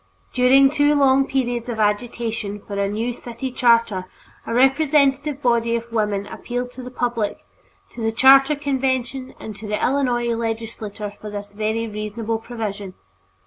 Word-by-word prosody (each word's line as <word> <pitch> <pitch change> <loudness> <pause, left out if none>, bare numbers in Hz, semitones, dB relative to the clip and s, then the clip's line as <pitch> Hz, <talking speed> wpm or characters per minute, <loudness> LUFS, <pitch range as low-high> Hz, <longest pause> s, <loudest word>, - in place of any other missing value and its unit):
During 265 +2 +5
two 295 0 +3
long 275 -1 +4
periods 245 -2 -1
of 225 -2 -4
agitation 215 -1 -1
for 205 - -10
a 200 0 0
new 225 +4 -2
city 240 +2 -6
charter, 230 -6 +2 0.4
a - - -3
representative 280 +1 +3
body 235 -1 +2
of 235 0 -5
women 210 -3 0
appealed 245 +3 -5
to 255 - -9
the 250 - -7
public, 235 -4 -2 0.5
to 235 - -8
the 225 0 +1
charter 270 +5 +6
convention, 265 -2 -2
and 215 - -7
to 215 - -8
the 210 0 -1
Illinois 245 -3 +1
legislature 225 -2 -4
for 215 - -6
this 205 0 -7
very 220 +2 -2
reasonable 215 +1 -3
provision. 210 -5 -6
235 Hz, 150 wpm, -21 LUFS, 215-260 Hz, 0.5 s, charter